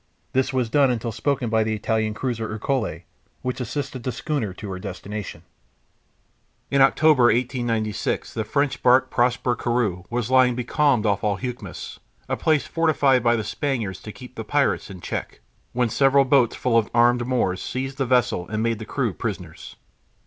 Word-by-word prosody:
This 130 0 +1
was 130 -3 0
done 135 +3 +3
until 115 -1 -2
spoken 130 0 -1
by 110 -1 +3
the 110 0 -1
Italian 110 0 -1
cruiser 115 -3 -3
Ercole, 110 - -2 0.4
which 125 0 -3
assisted 130 +1 -4
the 130 - -2
schooner 140 - -2
to 100 +2 -8
her 95 - -5
destination. 100 +2 -7 1.3
In 140 0 +3
October, 135 -1 +5
1896, 120 -3 0
the 110 - -2
French 140 +5 -1
barque 130 +1 +4
Prosper 125 0 +1
Corue 110 -7 -1
was 120 0 -2
lying 130 -1 +5
becalmed 125 -1 +1
off 100 -1 +1
Alhucemas, 105 -1 -4 0.3
a - - -1
place 155 -2 +1
fortified 145 -6 +2
by 120 0 +3
the 110 - -2
Spaniards 105 -4 -3
to 105 - -8
keep 125 +3 -12
the 115 - -6
pirates 140 +1 0
in 95 -2 -10
check, - - -5 0.3
when 125 0 +1
several 135 +3 +4
boats 130 -3 +3
full 115 -2 +2
of 110 - -3
armed 120 0 +4
Moors 95 -8 0
seized 135 +2 -4
the 135 - 0
vessel 120 -7 +1
and 110 0 -1
made 115 -2 0
the 110 - -6
crew 125 -8 -1
prisoners. 90 -6 -6
120 Hz, 170 wpm, -23 LUFS, 110-130 Hz, 1.3 s, October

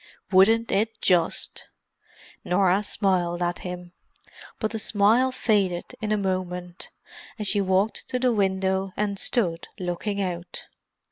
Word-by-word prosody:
"Wouldn't 220 +5 +5
it 220 +3 0
just?" 175 -3 +1 0.8
Norah 185 +1 +3
smiled 180 -4 0
at 175 0 -1
him; 180 -1 -7 0.7
but 215 - -1
the 225 - -3
smile 220 +5 +3
faded 200 -8 0
in 215 -1 -2
a 215 - +3
moment, 180 -2 -2 0.5
and 210 - -4
she 205 +1 +1
walked 190 +3 0
to 255 - 0
the 250 -1 +2
window 190 -1 0
and 200 -1 -1
stood 175 -9 0
looking 185 +3 -3
out. 180 -2 -4
195 Hz, 130 wpm, -25 LUFS, 180-210 Hz, 0.8 s, Wouldn't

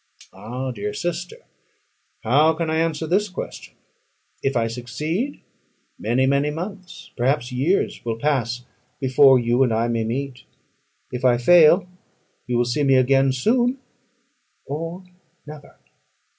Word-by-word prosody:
Ah, 120 +7 -5
dear 105 -3 -5
sister, 175 +1 -4 0.9
how 150 +7 +4
can 160 0 -2
I 160 - 0
answer 160 -1 -1
this 200 +6 +1
question? 185 - -8 0.7
If 135 -2 0
I 115 - +1
succeed, 150 - -4 0.6
many, 120 +4 +1
many 140 +2 +2
months, 185 +4 -8
perhaps 130 +1 0
years, 140 +10 0
will 115 -1 -3
pass 125 -3 -1 0.3
before 130 0 +5
you 120 +1 +1
and 125 -3 +3
I 115 +1 +1
may 115 -1 0
meet. 130 +3 -4 0.7
If 125 +1 -5
I 125 -2 +4
fail, 170 +7 +5 0.6
you 125 -1 0
will 120 - +2
see 120 +5 -1
me 135 -2 +4
again 135 +1 +3
soon, 240 - +1 0.9
or 165 +5 -5 0.4
never. 150 -2 -12
135 Hz, 130 wpm, -22 LUFS, 120-160 Hz, 0.9 s, before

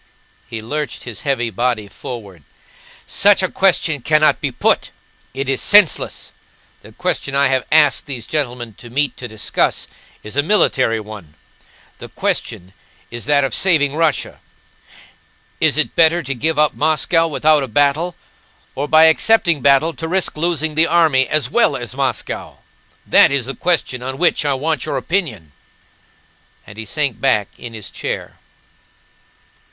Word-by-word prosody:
(He 110 -1 -6
lurched 150 +6 -5
his 115 -5 -6
heavy 120 -5 -1
body 120 0 -2
forward.) 100 -5 -9 0.6
"Such 200 -1 +3
a 185 - -1
question 165 -6 +1
cannot 155 +3 +2
be - - -2
put; - - +1 0.5
it 135 0 -4
is 135 -1 -1
senseless! 205 -5 +3 0.5
The - - -15
question 140 - -3
I 140 -1 +3
have 130 -1 -1
asked 150 -5 +3
these 125 -5 -5
gentlemen 125 -6 -3
to 120 - -11
meet 140 +4 0
to 125 - -7
discuss 110 -2 -1 0.4
is 105 - -9
a 145 - +3
military 135 - +1
one. 105 -8 -11 0.6
The - - -10
question 90 +2 -3 0.4
is 120 0 -5
that 145 -1 +2
of 135 - -2
saving 150 -6 +2
Russia. 160 -3 -1 1.2
Is - - +2
it - - +2
better 165 +1 +3
to 135 - -3
give 155 +6 -1
up 150 0 +3
Moscow 160 +2 +1
without 155 0 +2
a 135 - -3
battle, 145 +8 +1 0.6
or 145 +2 -4
by 155 +1 +5
accepting 165 -1 +3
battle 140 +5 +3
to 160 - -6
risk 185 +1 -1
losing 160 -1 -1
the 160 +2 +3
army 155 -6 +3
as 155 -1 0
well 240 - +3
as 120 0 -7
Moscow? 135 -3 -4 0.5
That - - +5
is 140 -3 0
the 135 - -4
question 160 -8 -1
on 130 +1 -5
which 170 -2 +1
I 140 -2 +1
want 150 0 -2
your - - -2
opinion," 135 - -3 1.1
and 100 +2 -13
he 110 - -6
sank 145 -1 -2
back 105 -7 +1
in 120 -2 -9
his 105 -3 -8
chair. - - -6
140 Hz, 155 wpm, -18 LUFS, 120-160 Hz, 1.2 s, by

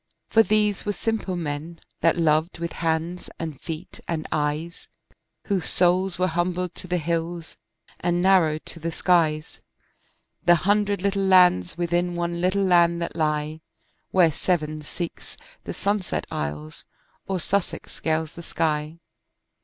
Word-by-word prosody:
For 225 - +6
these 210 -2 +2
were 205 - -1
simple 220 -4 -2
men 160 0 -4 0.2
that 165 +1 +3
loved 160 +1 +2
with 170 -1 -4
hands 165 +2 -2
and 155 -5 -6
feet 165 +3 -7
and 160 -2 -2
eyes, 155 +3 -2 0.6
Whose 195 -4 0
souls 180 +1 +2
were 180 - +2
humbled 175 +1 -1
to - - -6
the 180 0 0
hills 165 0 -3 0.4
and 175 0 +1
narrowed 175 -5 +3
to 165 - -7
the 165 +1 -3
skies, 160 -3 +1 0.8
The 175 0 +6
hundred 200 +3 +1
little 200 0 +1
lands 180 - +5
within 175 0 0
one 170 0 -2
little 185 +2 +2
land 170 -2 +4
that - - -5
lie, 155 -1 -1 0.5
Where 175 -4 +4
Severn 155 -1 -1
seeks 170 +3 -7 0.3
the - - -4
sunset 200 -2 -1
isles 75 +1 -5 0.4
or 190 -1 -1
Sussex 195 +3 -2
scales 160 0 -1
the 170 - -9
sky. 155 -1 -1
170 Hz, 140 wpm, -24 LUFS, 160-185 Hz, 0.8 s, For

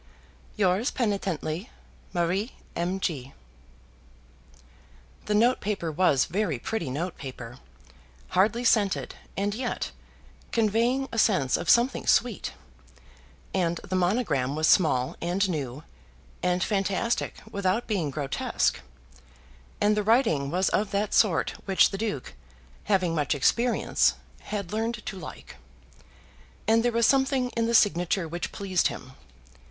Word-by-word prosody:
Yours 195 +3 +2
penitently, 195 - -2 0.4
MARIE 185 +6 -1 0.2
M. 180 +3 -1
G. 140 -8 -3 1.9
The 210 - 0
note 240 +4 +3
paper 195 -6 -2
was 150 -5 +3
very 180 -5 -1
pretty 165 - -3
note 165 +7 -4
paper, 125 -3 -8 0.7
hardly 210 +6 +2
scented, 210 -5 +2 0.2
and 200 +1 0
yet 245 +2 -3 0.6
conveying 235 +4 +1
a 230 - -1
sense 180 - +3
of - - -3
something 240 +2 +3
sweet, 240 -4 +2 1.0
and 175 -3 0
the 185 - -2
monogram 175 - +1
was 155 +1 +1
small 130 -8 +3
and 180 +4 +1
new, 145 -5 -4 0.6
and 180 0 +1
fantastic 200 +3 0 0.2
without 200 +2 0
being 190 -9 -1
grotesque, 140 -1 -1 1.0
and 210 +1 +3
the 210 - +1
writing 205 - +2
was 185 +4 +1
of 210 0 0
that 200 +1 -1
sort 185 -7 +3
which 195 -1 +4
the 195 - -3
Duke, 180 - -3 0.5
having 185 -4 +2
much 150 -2 0
experience, 235 - +2 0.3
had 200 -3 -4
learned 225 0 -2
to 195 - -5
like, - - -10 1.1
and 225 +1 +4
there 240 +1 +1
was 230 0 +2
something 265 -1 +2
in 230 -1 0
the 235 - +1
signature 180 -4 +3
which 175 +2 -4
pleased 190 -3 +1
him. 130 - -8
195 Hz, 125 wpm, -27 LUFS, 165-225 Hz, 1.9 s, which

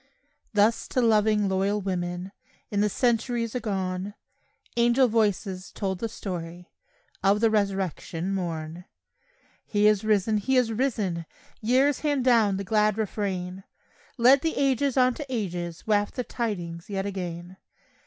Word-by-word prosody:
Thus 215 +2 +2
to - - -1
loving, 215 -3 +3
loyal 195 +2 +1
women, 180 -1 -3 0.4
In 205 -1 +1
the 210 - +2
centuries 235 0 0
agone, 195 -4 -3 0.6
Angel 240 +2 +4
voices 205 -4 0
told 190 -3 -3
the 230 - -2
story 175 -4 -7 0.5
Of 200 +1 +4
the 225 0 +3
resurrection 195 -3 -1
morn. 170 -2 -4 0.8
He 205 -1 +1
is 210 -1 +4
risen! 215 0 +2
He 260 +6 +1
is 245 -3 +3
risen! 210 -9 -1 0.3
Years 260 +5 +3
hand 290 -4 0
down 225 -6 +4
the 200 - -3
glad 210 +1 +2
refrain; 190 -3 -3 0.5
Let 260 +3 +6
the 325 +1 -1
ages 275 -1 +1
on 255 -1 +4
to 295 - -6
ages 175 -8 -4
Waft 205 -1 +1
the 250 - -1
tidings 175 -9 -4
yet 195 -1 -2
again. 180 -2 -5
205 Hz, 135 wpm, -26 LUFS, 185-230 Hz, 0.8 s, Let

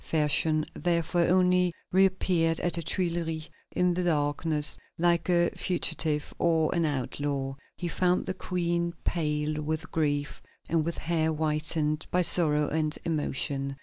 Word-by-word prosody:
Fersen, 155 0 +2
therefore, 170 0 0
only 180 -1 +3 0.2
reappeared 185 -3 +2
at 175 - -1
the 170 - +2
Tuileries 165 -2 -2 0.2
in 180 0 +1
the 180 +1 -1
darkness, 150 -1 +2 0.2
like 170 0 +2
a 175 -1 +3
fugitive 160 -3 -1
or 160 -2 +2
an 170 -2 +1
outlaw. 140 -1 -2 0.2
He 175 - -3
found 180 +1 +1
the 190 - -2
Queen 170 -2 -1
pale 150 -2 -1
with 155 +1 -4
grief 145 -2 -1 0.3
and 165 -1 +1
with 170 +1 -3
hair 160 -1 0
whitened 155 0 0
by 180 0 +2
sorrow 155 -3 +3
and 155 0 -1
emotion. 140 -3 -2
160 Hz, 135 wpm, -28 LUFS, 150-175 Hz, 0.3 s, only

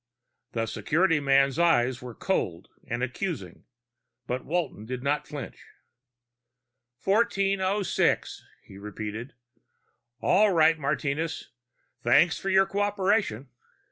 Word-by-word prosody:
The 115 -1 -1
security 165 +7 +1
man's 140 +1 +3
eyes 130 -8 +3
were 125 -2 -8
cold 90 - -2 0.2
and 120 +2 -2
accusing, 130 - -4 0.6
but 125 +1 -3
Walton 155 -10 -3
did 125 0 -5
not 145 +2 0
flinch. 145 -6 -8 1.4
"1406?" 195 -2 +1 0.2
he 95 - -13
repeated. 105 +4 -6 0.8
"All 200 +8 +4
right, 160 -1 +4
Martinez. 150 +2 -2 0.5
Thanks 160 +8 +4
for 195 - -3
your 190 0 +5
cooperation." 200 - 0
150 Hz, 100 wpm, -27 LUFS, 125-190 Hz, 1.4 s, your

